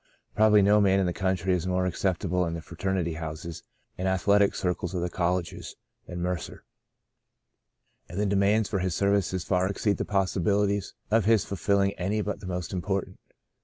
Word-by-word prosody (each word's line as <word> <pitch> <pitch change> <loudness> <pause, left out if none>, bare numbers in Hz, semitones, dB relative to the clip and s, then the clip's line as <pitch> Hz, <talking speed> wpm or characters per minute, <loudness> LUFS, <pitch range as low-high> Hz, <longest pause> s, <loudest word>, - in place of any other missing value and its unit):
Probably 105 -1 +5
no 105 +1 +5
man 100 -1 +4
in 95 - +2
the 90 - -1
country 95 -1 0
is 90 0 -1
more 90 0 +1
acceptable 90 0 0
in 85 - -3
the 85 - -5
fraternity 90 -1 -2
houses 80 +1 -6 0.4
and 95 - -1
athletic 100 +2 +3
circles 90 0 -2
of 90 - -1
the 90 - -2
colleges 90 0 -2 0.3
than 90 0 -5
Mercer, 90 -2 -4 1.5
and 90 +4 -5
the 105 - +1
demands 100 +2 +2
for 100 -2 -1
his 90 -2 -1
services 100 -2 +1
far 90 0 +1
exceed 100 +1 0
the - - -1
possibihties 100 +1 0 0.2
of 110 -2 +3
his 110 -3 +4
fulfilling 100 0 +1
any 100 +4 0
but 105 0 -3
the - - -9
most 90 -1 -4
important. 95 +1 -3
95 Hz, 170 wpm, -27 LUFS, 90-100 Hz, 1.5 s, Probably